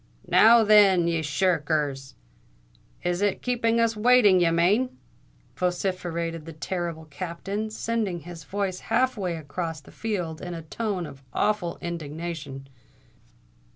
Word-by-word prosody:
"Now, 230 +1 +7
then, 200 -5 +6
ye 165 -1 0
shir 165 +3 +1
rkers! 145 -3 -2 0.9
is 175 +1 -1
it 205 -1 0
keeping 235 -2 +1
us 230 -1 +2
waiting 215 -4 +5
ye 175 -1 +4
mane?" 205 +10 +2 0.6
vociferated 175 -3 -2
the 165 - -7
terrible 165 +1 -4
Captain, 185 +8 -5
sending 215 -5 -2
his 170 0 -10
voice 190 +3 -3
half 255 +1 +2
way 185 -5 -2
across 160 0 -5
a - - -12
field 180 -8 -3
in 175 -1 -5
a 165 - -7
tone 185 +3 -3
of 135 -3 -11
awful 210 -5 0
indignation. 160 -4 -6
175 Hz, 130 wpm, -26 LUFS, 160-210 Hz, 0.9 s, Now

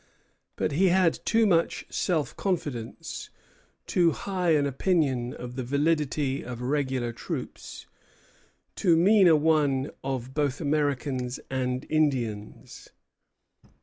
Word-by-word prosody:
But - - -1
he 180 +7 +3
had 180 -2 +2
too 225 0 +4
much 170 -5 +1
self 160 -5 -1
confidence; 145 - -4 0.6
too 170 -3 +2
high 180 -2 0
an 145 -1 +2
opinion 135 -4 0
of 125 0 -8
the 130 - -3
validity 145 0 0
of 120 -1 -7
regular 130 -2 -1
troops; - - -7 0.9
too 175 -4 +3
mean 195 +2 +5
a 165 - +7
one 145 -3 +2
of 130 -1 -4
both 145 -3 0
Americans 140 -4 -1
and 130 0 -2
Indians." 125 -9 -2
145 Hz, 115 wpm, -27 LUFS, 130-165 Hz, 0.9 s, a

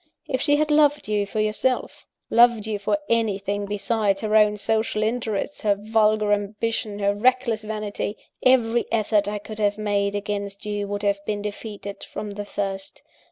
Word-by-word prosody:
If 260 -1 -1
she 290 0 +3
had 305 +1 +1
loved 295 -2 +4
you 205 -1 0
for 215 - -3
yourself, 215 +4 -1 0.2
loved 235 -2 +5
you 215 -2 -2
for 205 +9 +1
anything 205 -3 0
besides 205 -1 0
her 215 0 0
own 210 -1 +5
sensual 215 +1 0
interests, 225 +3 -2
her 205 -3 +3
vulgar 215 0 +2
ambition, 210 +1 -2
her 200 0 +1
reckless 240 0 +2
vanity, 210 -1 -4 0.2
every 240 -2 +3
effort 215 -2 +2
I 210 0 -2
could 215 +1 -9
have 205 -1 +1
made 205 -1 0
against 200 0 -4
you 205 -1 -2
would 205 0 -4
have 200 0 0
been 205 -1 -2
defeated 205 -1 -6
from 210 -1 -6
the 205 0 -6
first. 195 -1 -4
210 Hz, 165 wpm, -24 LUFS, 205-225 Hz, 0.2 s, loved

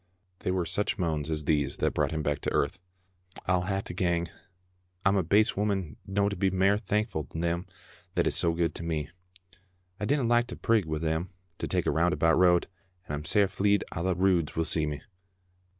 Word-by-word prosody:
They - - -3
were 90 -1 0
such 105 +5 -1
moans 80 -4 -1
as 75 -1 -1
these 70 -2 +1
that - - 0
brought 75 -2 +1
him 80 0 -3
back 75 -1 0
to - - -2
earth: - - 0 0.2
— 90 0 -42
'' 90 0 -15
I'll 90 0 +1
hae 95 0 -1
to 90 - -8
gang... 85 -1 0 0.8
I'm 95 +1 +4
a 95 - +3
base 105 +6 +3
woman 100 -6 -1
no' 100 +1 +1
to 100 - -2
be 95 +1 +1
mair 95 +2 +3
thankfu' 105 - -2
to - - -8
them 85 +1 -1 0.5
that - - +2
is - - +1
so 85 - +2
good 85 -1 0
to - - -6
me... 80 -2 -3 0.9
I 105 - -2
dinna 140 +4 +1
like 120 0 +3
to - - -6
prig 115 -5 +2
wi' 80 0 -2
them 80 +3 -1 0.3
to - - -2
take 90 -2 0
a - - +2
roundabout 85 0 +2
road, 90 -1 +5 0.4
and - - -6
I'm 75 +1 -4
sair 105 +3 +5
fleid 100 +1 +1
a' 80 - -4
the 90 0 +1
Roods 90 -3 +2
will 80 - 0
see 80 -2 +1
me 75 -1 -5
90 Hz, 215 wpm, -28 LUFS, 80-100 Hz, 0.9 s, road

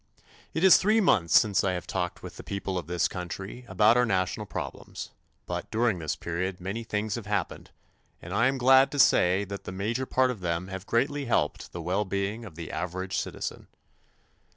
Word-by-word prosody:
It 160 - 0
is 190 - +9
three 215 +3 +3
months 90 - +5
since 100 -3 +1
I 95 - +1
have 90 - -4
talked 90 -2 -3
with - - -9
the - - -9
people 100 -1 -4
of 90 -4 -3
this 90 0 +1
country 95 +6 -7
about 110 +2 +4
our 125 - +4
national 95 -3 -1
problems; - - -6 0.3
but - - -4
during 110 -4 +1
this 80 -2 -2
period 90 +2 -3
many 100 +6 -4
things 105 -1 -2
have 110 -2 -5
happened, 100 -4 -2 0.5
and 85 - -8
I 115 +5 +3
am 135 0 0
glad 130 +2 +6
to - - -3
say 95 -7 +4
that 100 0 -7
the - - -5
major 110 +8 -2
part 130 0 +2
of 120 - -7
them 85 +1 -2
have 95 +1 -7
greatly 140 +4 0
helped 75 - 0
the 85 - -6
well 95 +5 0
being 100 +3 -3
of 95 -7 -11
the 85 -1 -7
average 95 +3 -3
citizen. - - -5
100 Hz, 200 wpm, -27 LUFS, 90-120 Hz, 0.5 s, is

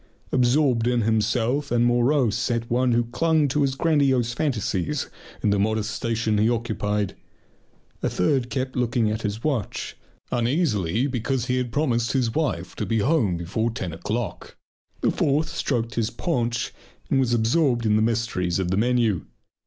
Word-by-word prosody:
Absorbed 125 -2 +3
in 120 -1 +2
himself 115 +6 +1
and 120 0 +2
morose 120 -1 +2
sat 115 -1 -1
one 125 +1 +2
who 120 +1 +3
clung 155 +5 +2
to 145 +2 0
his 135 -1 +1
grandiose 135 -6 +2
fantasies 120 - -1 0.3
in 105 - +3
the 100 - +2
modest 110 +1 0
station 115 -2 -1
he 110 +2 +3
occupied. 105 -4 -1 0.9
A - - 0
third 125 +6 +1
kept 130 -1 -3
looking 120 -3 +1
at 110 +1 -3
his 105 +1 -3
watch 120 -7 -2 0.4
uneasily 120 - +1
because 130 -1 -1
he 125 0 0
had 125 -2 -2
promised 120 -5 0
his 125 -4 +1
wife 140 - -2
to - - -2
be 115 - +1
home 110 - +2
before 95 +7 -1
ten 95 -7 -5
o'clock. 105 +7 -4 0.4
The - - +2
fourth 150 +2 +1
stroked 115 -4 -2
his 115 -1 0
paunch 120 -8 -2 0.4
and 135 - +3
was 130 -3 +1
absorbed 120 +1 +2
in 105 -1 +3
the 110 - +3
mysteries 110 -6 0
of 90 -2 -1
the 95 - +1
menu. 115 -4 +1
120 Hz, 160 wpm, -24 LUFS, 110-130 Hz, 0.9 s, Absorbed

